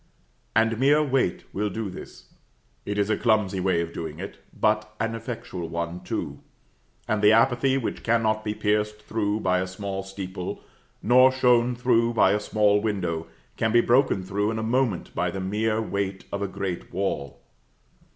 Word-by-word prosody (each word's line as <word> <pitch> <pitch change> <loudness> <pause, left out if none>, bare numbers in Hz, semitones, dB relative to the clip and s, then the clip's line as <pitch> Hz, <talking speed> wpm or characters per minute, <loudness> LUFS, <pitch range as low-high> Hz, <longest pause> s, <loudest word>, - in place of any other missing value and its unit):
And 115 0 +2
mere 145 +3 +4
weight 135 -9 0
will 105 +2 -1
do 110 +2 -4
this; 90 - -11 0.5
it 105 0 -2
is 100 +1 +1
a - - +2
clumsy 105 -5 +1
way 90 -2 +1
of 85 0 -5
doing 80 -2 -5
it, 95 - -7
but 105 0 0
an 115 0 -1
effectual 110 -7 -6
one, 85 +1 -3
too; - - -4 0.7
and 110 -1 0
the 105 0 +6
apathy 130 +3 +3
which 130 - -3
cannot 110 -2 +1
be 105 0 -2
pierced 105 0 0
through 105 0 -1
by 90 0 +2
a 95 - -2
small 95 +1 -4
steeple, 95 -1 -6 0.4
nor 130 +3 +6
shone 125 -1 +3
through 120 -1 +2
by 95 - +5
a 105 - +2
small 105 -1 +2
window, 90 -7 -2 0.3
can 110 - +1
be 120 - +5
broken 120 -6 +3
through 100 +3 -1
in 110 - -2
a 110 - -2
moment 115 -5 0
by - - 0
the 95 - -5
mere 110 +3 0
weight 100 -3 -3
of 100 - -3
a 100 - 0
great 95 -2 -5
wall. 85 -7 -3
105 Hz, 175 wpm, -25 LUFS, 95-115 Hz, 0.7 s, the